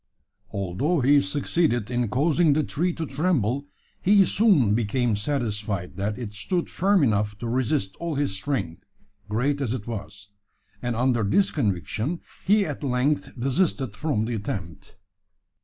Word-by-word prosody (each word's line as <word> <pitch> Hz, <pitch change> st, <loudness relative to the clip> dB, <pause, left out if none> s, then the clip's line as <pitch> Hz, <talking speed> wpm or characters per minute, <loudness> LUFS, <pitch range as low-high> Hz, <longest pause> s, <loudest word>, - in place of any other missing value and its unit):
Although 100 Hz, -, -1 dB
he 140 Hz, +3 st, +5 dB
succeeded 140 Hz, -4 st, 0 dB
in 120 Hz, -1 st, 0 dB
causing 150 Hz, -, +3 dB
the 155 Hz, +2 st, +2 dB
tree 175 Hz, +6 st, 0 dB
to 165 Hz, -, -4 dB
tremble, 140 Hz, -, 0 dB, 0.3 s
he 200 Hz, 0 st, +5 dB
soon 180 Hz, -, +4 dB
became 120 Hz, +1 st, +1 dB
satisfied 105 Hz, -6 st, -2 dB
that 105 Hz, +2 st, -2 dB
it 115 Hz, -5 st, -6 dB
stood 165 Hz, -, -2 dB
firm 195 Hz, -2 st, +3 dB
enough 105 Hz, -4 st, +1 dB
to 120 Hz, -, -5 dB
resist 120 Hz, -4 st, 0 dB
all 170 Hz, -2 st, -3 dB
his 140 Hz, -8 st, 0 dB
strength, 95 Hz, -, -3 dB, 0.4 s
great 135 Hz, +7 st, 0 dB
as 125 Hz, -2 st, -1 dB
it 105 Hz, -5 st, -6 dB
was: 100 Hz, -3 st, -7 dB, 0.5 s
and 120 Hz, -1 st, -2 dB
under 120 Hz, -1 st, +2 dB
this 145 Hz, -, +2 dB
conviction 110 Hz, -, -1 dB, 0.2 s
he 205 Hz, +1 st, +4 dB
at 150 Hz, -1 st, -5 dB
length 135 Hz, +1 st, 0 dB
desisted 135 Hz, -, 0 dB
from 110 Hz, -3 st, -1 dB
the 120 Hz, -, -3 dB
attempt. 95 Hz, -6 st, -6 dB
125 Hz, 145 wpm, -25 LUFS, 105-150 Hz, 0.5 s, he